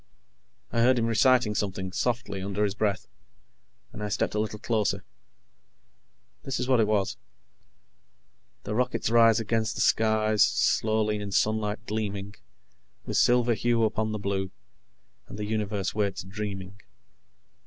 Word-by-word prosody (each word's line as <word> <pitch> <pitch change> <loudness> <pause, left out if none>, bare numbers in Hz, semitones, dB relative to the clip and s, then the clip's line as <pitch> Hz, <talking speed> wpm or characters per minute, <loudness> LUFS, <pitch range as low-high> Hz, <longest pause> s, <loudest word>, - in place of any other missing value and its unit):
I 115 - +1
heard 125 +2 +4
him 115 - +1
reciting 120 0 +3
something, 95 -2 -3
softly, 115 -3 -2
under 100 +2 -2
his 100 -2 0
breath, 100 -2 -1 0.9
and - - -8
I 105 - -3
stepped 100 - -1
a 105 - -1
little 105 0 -2
closer. 105 -3 -1 1.4
This 135 - -3
is 125 - -2
what 130 -2 +3
it 110 - +3
was: 105 -3 0 1.5
"_The 105 - -3
rockets 125 -1 0
rise 115 -1 +5
against 110 0 -1
the - - -2
skies, 110 -1 +2
Slowly; 110 -1 +2
in 105 -1 -5
sunlight 110 +2 0
gleaming 100 -2 -4 0.7
With - - -2
silver 120 -1 +4
hue 115 +1 +1
upon 110 0 0
the 110 - -2
blue. 100 -1 -2 0.8
And - - -9
the 105 - -3
universe 105 -2 -2
waits, 100 -4 -1
dreaming. 100 -1 -6
105 Hz, 140 wpm, -27 LUFS, 100-115 Hz, 1.5 s, rise